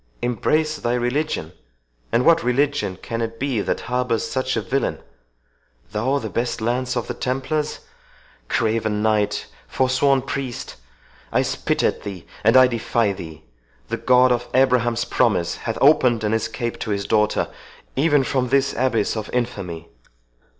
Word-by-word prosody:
—embrace 155 +6 +1
thy 120 -2 -1
religion! 125 - -1 0.6
and 120 - +2
what 170 - +5
religion 130 -5 0
can 115 0 -3
it 115 0 -4
be 130 -6 0
that - - -2
harbours 125 -2 -1
such 130 0 -1
a - - +1
villain?—THOU - - -4
the 110 - -5
best 120 +5 -1
lance 125 +2 -1
of 120 - -1
the - - -4
Templars!—Craven 115 - -3
knight!—forsworn 130 +5 +1
priest! 135 -2 -5 0.6
I - - +2
spit - - -1
at - - +1
thee, 100 -4 -7 0.2
and 115 +4 +6
I 130 - +9
defy 115 -3 0
thee.—The - - -10
God 125 0 +4
of 120 0 0
Abraham's 125 -3 +3
promise 105 -9 +1
hath - - -4
opened 125 -6 +4
an 105 0 +1
escape 115 +1 -2
to - - -4
his 100 -1 -1
daughter—even 135 +6 0
from 130 -1 0
this 140 +2 +2
abyss 120 -5 +1
of 110 -1 -4
infamy!" 90 -9 -3
120 Hz, 135 wpm, -22 LUFS, 105-130 Hz, 0.6 s, I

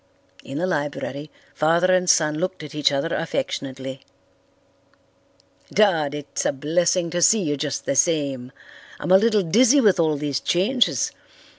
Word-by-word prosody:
In 135 - -7
the 175 - -1
library 145 -3 -4 0.2
father 170 +4 +2
and 180 -1 +1
son 155 -1 +2
looked 185 -2 -4
at 150 - -10
each 150 -1 +2
other 140 +4 -2
affectionately. 135 - -4 1.7
"Dad, 165 -8 +2
it's 145 -1 -5
a - - +1
blessing 170 +5 0
to 175 +1 -2
see 215 +3 +4
you 145 -3 -1
just 145 0 -4
the - - -1
same. 140 -5 0 0.5
I'm 180 - -3
a 190 - +8
little 215 -2 +2
dizzy 240 - +4
with 205 -8 +3
all 155 -3 +1
these 140 -1 -2
changes. 210 - +1
160 Hz, 150 wpm, -22 LUFS, 145-185 Hz, 1.7 s, a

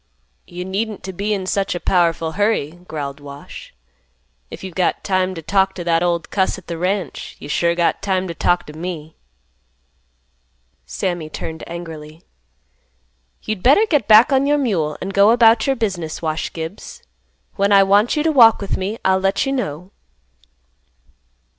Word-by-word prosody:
"You 180 0 -7
needn't 205 +3 -3
t' 190 - -5
be 200 +3 -3
in 195 -3 -1
such 195 0 -1
a - - -3
powerful 165 -3 +1
hurry," 205 -5 0 0.2
growled 145 -2 -5
Wash. 140 0 -11 0.8
"If - - -10
you've 190 -2 -7
got 180 +1 0
time 185 -1 0
t' 165 - -8
talk 195 +3 +1
t' 175 - -5
that 165 -1 +1
old 170 -1 -1
cuss 190 -1 0
at 185 - -13
th' - - -9
ranch, 180 0 -3
you - - -10
sure 170 +3 +1
got 170 -1 0
time 190 -1 -1
t' 170 - -5
talk 175 +1 +1
t' 150 - -11
me." 160 -1 -7 1.7
Sammy 155 - -3
turned 160 +1 -7
angrily. 160 -2 -9 1.2
"You'd 215 -3 -4
better 285 - +5
get 295 - 0
back 220 +5 +7
on 270 +1 +3
your 295 0 +3
mule, 180 - -1
and 195 +2 -5
go 200 +2 +5
about 230 +1 +5
your 270 - +2
business, 185 -9 -3
Wash 155 -1 -3
Gibbs. 165 +5 -8 0.5
When 200 +1 +1
I 195 -1 +7
want 205 +4 +3
you 300 - +1
to 320 - +2
walk 235 -6 +6
with 200 - -3
me, 200 +4 -3
I'll 190 0 +3
let 195 +7 0
you 270 - -1
know." 180 - -4
185 Hz, 170 wpm, -19 LUFS, 165-205 Hz, 1.7 s, back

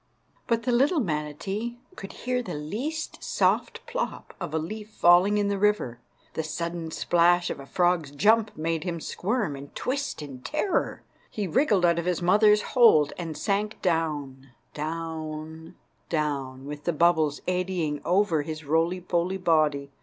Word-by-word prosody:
But 230 -1 +1
the 250 - 0
little 275 +8 +3
manatee 195 - -3 0.2
could 195 - -8
hear 250 0 0
the 235 - -6
least 240 - -4
soft - - 0
plop - - -4
of - - -4
a 160 - 0
leaf 210 +7 -5
falling 185 +1 +5
in 205 -1 +1
the 200 -1 -1
river. 205 - +1 0.3
The - - -1
sudden 170 +1 -4
splash 175 +2 +3
of - - -5
a 140 - -10
frog's 175 -3 +1
jump 210 +9 +2
made 160 0 -1
him 175 -2 -3
squirm 200 - -2
and 140 +1 -11
twist 275 - -2
in 135 -3 -9
terror. 305 - -1 0.3
He 210 - -3
wriggled 205 - +3
out 170 0 +3
of 170 - -3
his 180 -3 +1
mother's 210 +4 +4
hold, 190 - +6
and 165 -3 -5
sank 210 +1 -1
down, 145 -6 -1 0.2
down, 160 0 -5 0.3
down, 140 -4 -2
with 145 0 -7
the 175 - +1
bubbles 160 -2 +2
eddying 180 -5 -1
over 180 -4 +2
his 155 0 -6
roly 165 +5 +1
poly 175 +2 0
body. 155 -5 +1
170 Hz, 155 wpm, -26 LUFS, 155-205 Hz, 0.3 s, hold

